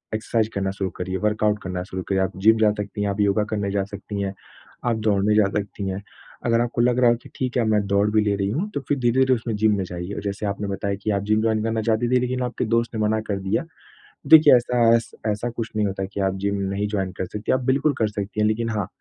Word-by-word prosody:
Exercise 110 0 0
करना 95 -1 -1
शुरू 95 -1 -3
करिए, 95 +1 -3
वर्कआउट 105 0 +1
करना 90 -1 -3
शुरू 95 0 -6
करिए। 95 -1 +2
आप 95 - 0
जिम 110 +3 +5
जा 105 -1 +4
सकती 105 0 -5
हैं, 100 - 0
आप 100 +1 -3
योगा 100 +1 +2
करने 100 -2 -1
जा 100 -1 0
सकती 100 0 -5
हैं, 100 0 -2 0.5
आप 120 -2 +2
दौड़ने 105 +1 +3
जा 105 -2 +5
सकती 100 -1 -4
हैं, 95 +1 -4 0.4
अगर 115 0 +3
आपको 120 0 -1
लग 125 +1 +2
रहा 120 -2 +5
हो - - +2
कि - - -13
ठीक 125 -1 -2
है, 120 - +3
अब 110 - 0
मैं 105 -1 +2
दौड़ 100 +1 +2
भी 110 0 +3
ले 100 -1 +1
रही 100 -1 0
हूँ 175 - -2
तो 145 - -1
फिर 145 - +2
धीरे-धीरे 130 +2 +3
उसमें 115 -1 -3
जिम 110 0 +3
में 95 - -1
जाइए। 90 +3 -5
जैसे 100 +1 -3
आपने 100 +1 -3
बताया 100 0 -2
कि 110 - -1
आप 100 -1 0
जिम 110 +1 +2
जॉइन 110 -1 +1
करना 110 0 0
चाहती 115 +2 +1
थी 125 - +5
लेकिन 125 0 -2
आपके 125 0 -2
दोस्त 115 +1 0
ने 110 - -1
मना 110 +1 +1
कर 100 -1 -1
दिया। 95 0 0 0.6
देखिए 155 -3 +8
ऐसा 120 0 +2
ऐस 115 - -1 0.2
ऐसा 105 +3 -1
कुछ 115 -1 -5
नहीं 105 -1 +1
होता 95 0 -3
है 95 - -5
कि - - -4
आप 95 0 0
जिम 100 - +1 0.2
नहीं 100 +1 -1
जॉइन 95 -3 -2
कर 95 - -1
सकतीं। 105 +3 -2
आप 130 - -1
बिल्कुल 140 +3 +2
कर 110 - +3
सकती 105 0 -5
हैं, 105 - +4
लेकिन 115 +1 0
हाँ, 105 -3 -2
105 Hz, 270 wpm, -23 LUFS, 100-115 Hz, 0.6 s, देखिए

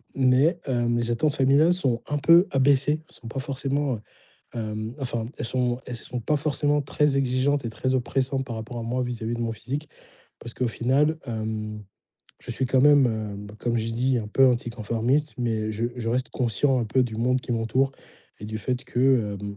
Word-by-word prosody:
Mais, 135 +6 +3
heu, 120 -2 0
mes 120 0 0
attentes 145 +5 +1
familiales 140 +6 +4
sont 130 -10 0
un 145 - -1
peu 170 +5 +6
abaissées, 140 +3 +3
elles - - -19
sont 115 - -12
pas 135 - -4
forcément, 135 0 -1
heu, 105 - -10 0.5
hem, 110 0 -4
enfin, 120 -3 -2
elles - - -3
sont 125 0 0
elles 125 - -5
sont 125 +2 -6
pas 150 +7 +1
forcément 145 0 +1
très 140 0 +1
exigeantes 135 +1 +1
et 115 - -3
très 130 +4 -1
oppressantes 130 +2 0
par 120 -3 -6
rapport 115 +2 -6
à - - -4
moi, 125 +2 -1
vis-à-vis 120 -1 -3
de 120 - -5
mon 115 -1 -1
physique. 135 +8 -5 0.5
Parce 120 - -7
qu'au 125 -2 0
final, 140 +8 +1
hem, 110 -2 -4 0.6
je 120 - -7
suis 130 +2 0
quand 130 0 +3
même, 145 -2 +6 0.4
heu, - - -13
comme 120 -1 -1
j'ai 115 0 -1
dis, 125 +2 +1
un 105 -2 -5
peu 135 +4 +5
anticonformiste, 120 +4 0
mais 110 -3 -1
je 115 +3 -1
je 115 -2 -3
reste 125 +2 -1
conscient 125 +2 +1
un - - 0
peu, 130 +4 +2
du 110 -2 -5
monde 125 +2 +1
qui 125 - -4
m'entoure 120 +4 +1 0.5
et - - -7
du 110 0 -4
fait 125 +3 -2
que, 125 -5 +2
hem, 100 0 -6
125 Hz, 200 wpm, -25 LUFS, 115-135 Hz, 0.6 s, peu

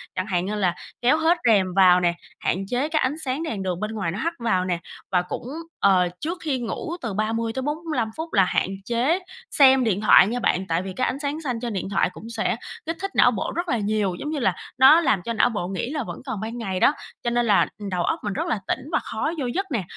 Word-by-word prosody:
chẳng 185 0 -2
hạn 180 -2 0
như 210 +2 -2
là 185 -4 +1 0.3
kéo 255 +5 +4
hết 325 +2 +3
rèm 195 -5 +3
vào 185 -1 +6
nè, 175 -1 +2 0.3
hạn 190 +3 -1
chế 250 +7 -1
cái 310 -1 +1
ánh 260 +3 +1
sáng 265 +5 -2
đèn 215 -11 -3
đường 180 -2 -2
bên 215 +2 -3
ngoài 195 -6 -2
nó 190 - -5
hắt 335 +6 -1
vào 185 -6 +1
nè. 175 -2 -1 0.3
Và 180 -2 +3
cũng, 180 +6 -6 0.3
ờ, 185 -2 +4
trước 335 +4 -3
khi 285 -5 -1
ngủ 245 +8 -4
từ 230 -5 -3
30 225 +2 -1
tới 265 - -3
45 300 -4 -2
phút 320 +1 -5
là 195 - +5
hạn - - +1 0.2
chế 250 - +1 0.3
xem 265 -2 +6
điện 210 -4 0
thoại 195 -2 +7
nha 240 +3 -2
bạn, 190 -5 0
tại 165 0 0
vì 190 0 -6
cái 255 +7 0
ánh 270 - -3
sáng 290 +2 -3
xanh 250 -7 -2
trên 235 -1 -4
điện 190 -1 -3
thoại 200 - +2
cũng 225 - -10
sẽ 225 -2 -1 0.3
kích 330 +1 -3
thích 390 0 -3
não - - +6
bộ - - -3
rất 345 +1 -2
là 240 - +1
nhiều, 205 -3 0
giống 295 - -4
như 305 -1 -2
là 250 - +1 0.2
nó 270 +6 +8
làm 215 - +2
cho 230 - -2
não 230 - +3
bộ 205 -7 -3
nghĩ 195 +5 -3
là 295 -1 -2
vẫn - - -8
còn 255 -7 -4
ban 225 +2 -5
ngày 195 -6 -3
đó, 280 - +5 0.3
cho 240 - +1
nên 240 0 +1
là, 205 -3 +4
ừm, 205 -2 -6
đầu 180 -2 -1
óc - - 0
mình 205 - -2
rất - - -2
là 220 - 0
tỉnh - - 0
và - - +2
khó 225 +8 -3
vô 270 - -1
giấc 355 +11 -1
nè. 225 -7 0
225 Hz, 265 wpm, -24 LUFS, 195-275 Hz, 0.3 s, nó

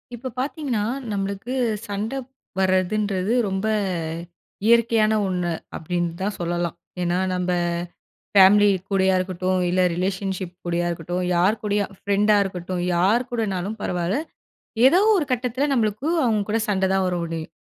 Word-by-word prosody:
இப்ப 255 +2 -6
பார்த்தீங்கன்னா, 265 -6 -1 0.3
நம்மளுக்கு 200 +4 -3 0.3
சண்ட 205 +3 -3 0.5
வர்றதுன்றது 190 +2 +1 0.2
ரொம்ப 190 +2 -1 1.0
இயற்கையான 230 -1 +4
ஒண்ணு, 180 -2 -1 0.2
அப்டின்னு 175 +1 -2
தான் 205 +1 -1
சொல்லலாம். 175 -1 -2 0.3
ஏன்னா 175 0 +1 0.2
நம்ப 180 0 -1 0.8
ஃபேமிலி 205 +1 +7 0.2
கூடயா 190 -1 +3
இருக்கட்டும், 185 0 -1
இல்லை 185 +1 +2
ரிலேஷன்ஷிப் 190 0 -2
கூடயா 175 0 0
இருக்கட்டும், 175 +2 -3
யார் 190 +5 +2
கூடயும் 205 -1 -1
ஃப்ரெண்டா 205 +1 +3
இருக்கட்டும், 185 -1 -4
யார் 200 +8 +3
கூடனாலும் 210 -3 -2
பரவால்ல. 175 +3 -1 0.7
ஏதோ 320 +7 +6 0.2
ஒரு 340 - +1
கட்டத்ல, 250 +3 0
நம்மளுக்கு 220 +1 0 0.2
அவங்க 220 -4 +2
கூட 225 - +2
சண்ட 190 -2 +1
தான் 190 -1 +2
வர 180 - 0
முடியும். 165 -1 -5
195 Hz, 125 wpm, -23 LUFS, 180-215 Hz, 1.0 s, ஃபேமிலி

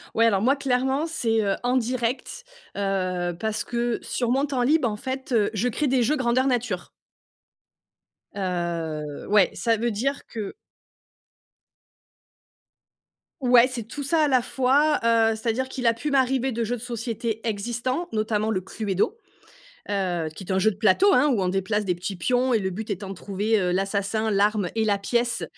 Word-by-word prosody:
Ouais 230 - +4
alors 200 -2 +2
moi 270 +3 +4
clairement 265 +3 0
c'est, 225 -8 0
heu, 195 -1 +1
en 250 +1 +1
direct, 255 - -2 0.3
heu, 185 -3 -1
parce 220 -1 -2
que 240 0 -1
sur 240 -2 -2
mon 270 +3 +2
temps 265 -3 -2
libre, 285 +1 +3
en 210 - -2
fait, 260 +4 -5
heu, 220 -4 +3
je 220 +4 +1
crée 290 +5 0
des 255 -2 +2
jeux 295 +7 +2
grandeur 255 0 +2
nature. 245 -2 -1 1.5
Heu, 170 -6 -3
ouais, 205 -2 +4
ça 230 -2 +1
veut 235 +1 0
dire 275 +7 -2
que 215 -4 -6 2.9
Ouais, 245 -1 +6
c'est 250 -3 -5
tout 255 +7 -7
ça 310 +3 +2
à - - +3
la 255 -2 +4
fois, 280 +5 +2
heu, 225 -1 +3
c'est-à-dire 230 +3 -1
qu'il 260 -1 -5
a 230 - +5
pu 290 +6 -4
m'arriver 265 -1 +2
de 230 +1 -1
jeux 240 +2 -2
de - - -12
société 230 -2 -4
existants, 240 +9 -2
notamment 215 0 0
le 185 -4 0
Cluedo, 205 - -2 0.7
heu, 180 -5 -1
qui 195 - -8
est 190 - -5
un 190 - +2
jeu 210 +3 +4
de 210 - -5
plateau, 220 - +4
hein, 295 - +4
où 235 -8 +1
on 185 - +1
déplace 195 +3 0
des 180 -3 0
petits 180 +3 -5
pions 250 +8 +1
et 225 - +3
le 190 -2 -1
but 215 +4 -5
étant 195 0 -4
de 195 - -6
trouver, 205 +4 0
heu, 180 -2 0
l'assassin, 200 +3 0
l'arme 205 -2 +2
et 220 -1 +1
la 205 -2 +1
pièce, 235 +4 0
225 Hz, 180 wpm, -25 LUFS, 200-255 Hz, 2.9 s, Ouais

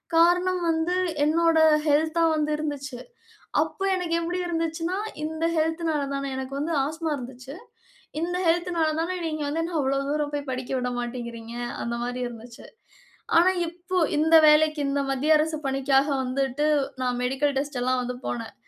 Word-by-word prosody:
காரணம் 355 +2 +4
வந்து, 330 +2 +1 0.3
என்னோட 330 +1 +3 0.3
ஹெல்த்தா 315 +3 +2
வந்து 305 0 0
இருந்துச்சு. 290 -4 -4 0.6
அப்ப, - - -10 0.2
எனக்கு 350 -2 -1
எப்டி 350 +2 -2
இருந்துச்சுன்னா, 330 +2 -2 0.3
இந்த 320 +1 -2
ஹெல்த்னால 320 -1 0
தான, 275 - -3
எனக்கு 265 +1 -5
வந்து 320 +3 -2
ஆஸ்மா 315 +2 -3
இருந்துச்சு. 255 +2 -9 0.7
இந்த 355 +2 -1
ஹெல்த்னால 340 -1 +1
தான, 335 - -2 0.2
நீங்க 310 -1 -3
வந்து 325 +3 -1
என்ன 340 -1 -3
அவ்ளோ 275 0 +1
தூரம் 295 -1 -1
போய் 285 -1 -4
படிக்க 255 0 -5
விட 250 0 -2
மாட்டேங்கிறீங்க, 235 -1 -6 0.3
அந்த 235 0 -2
மாரி 245 +1 -3
இருந்துச்சு. 235 0 -11 0.7
ஆனா, 345 +3 +6 0.2
இப்ப 355 +2 -2 0.2
இந்த 320 +2 +4
வேலைக்கு 305 0 +5
இந்த 280 0 0
மத்திய 280 +4 +3
அரசு 310 +1 0
பணிக்காக 270 +1 +2 0.2
வந்துட்டு, 270 +2 -1 0.4
நான் 250 -1 0
மெடிக்கல் 270 +3 0
டெஸ்ட்டெல்லாம் 255 -2 0
வந்து 250 0 -4
போனேன். 230 -2 -4
300 Hz, 150 wpm, -25 LUFS, 265-330 Hz, 0.7 s, ஆனா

